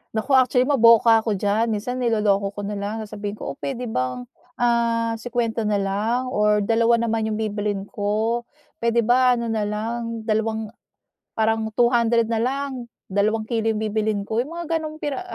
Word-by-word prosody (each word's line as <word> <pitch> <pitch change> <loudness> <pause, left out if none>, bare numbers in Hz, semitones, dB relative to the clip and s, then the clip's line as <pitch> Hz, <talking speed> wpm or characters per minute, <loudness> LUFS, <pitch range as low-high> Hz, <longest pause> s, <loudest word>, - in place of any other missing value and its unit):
Naku, 220 +6 -2
actually, 255 -1 +4
maboka 230 -4 +5
ako 220 -2 -1
diyan. 205 +4 +1
Minsan 225 +4 -2
niloloko 210 -4 +1
ko 205 - -5
na 205 0 -4
lang, 210 +2 -4
sabihin 205 -1 -6
ko, - - -6
"Oh, - - -11
puwede 255 -3 -4
bang, 125 - -2 0.3
ah, 235 -1 +1
₱50 230 -2 -2
na 210 - +1
lang 215 +6 -1
or 210 -3 +2
dalawa 230 +2 +3
naman 225 -1 0
'yong 215 - -2
bibilhin 210 -2 -2
ko. 215 +4 -2 0.3
Puwede 235 0 +2
ba, 250 +2 +4
ano 235 -1 -3
na 215 -2 -1
lang, 230 +2 -4
dalawang, 220 0 -1 0.7
parang 220 0 +1
₱200 235 -1 +3
na 225 0 -1
lang, 260 -1 -3 0.2
dalawang 215 +3 0
kilo 225 -1 -1
'yong 220 - 0
bibilhin 215 -1 -1
ko." 220 +3 0
'Yong 265 - -6
mga 340 +1 -6 0.2
gano'ng 310 0 -6
piraha 295 +2 -3
225 Hz, 170 wpm, -23 LUFS, 210-235 Hz, 0.7 s, maboka